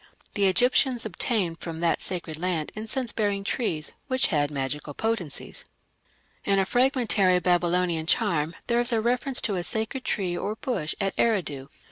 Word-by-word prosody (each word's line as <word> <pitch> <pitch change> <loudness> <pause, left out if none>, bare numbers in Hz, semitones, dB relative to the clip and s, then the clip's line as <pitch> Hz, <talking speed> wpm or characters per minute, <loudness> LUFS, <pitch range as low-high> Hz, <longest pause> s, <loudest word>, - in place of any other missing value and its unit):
The 200 -1 +2
Egyptians 245 +5 +3
obtained 190 -3 0
from 165 -1 -6
that 170 -1 +1
sacred 170 -4 -4
land 170 -3 -1
incense 225 +3 -2
bearing 205 -2 -1
trees 170 -8 -1
which 260 -1 +2
had 145 -1 +2
magical 145 +1 -4
potency. 215 -11 -3 0.9
In 200 - +2
a 195 - +3
fragmentary 235 -6 +3
Babylonian 175 -2 +1
charm 165 -1 +1
there 235 0 +1
is 240 - +2
a 230 - +2
reference 250 +3 +1
to 200 -4 0
a 175 - -2
sacred 220 +7 -1
tree 185 -4 -1
or 205 +4 -3
bush 230 - -2
at 195 -1 0
Eridu. 160 -12 0
190 Hz, 155 wpm, -26 LUFS, 165-230 Hz, 0.9 s, Egyptians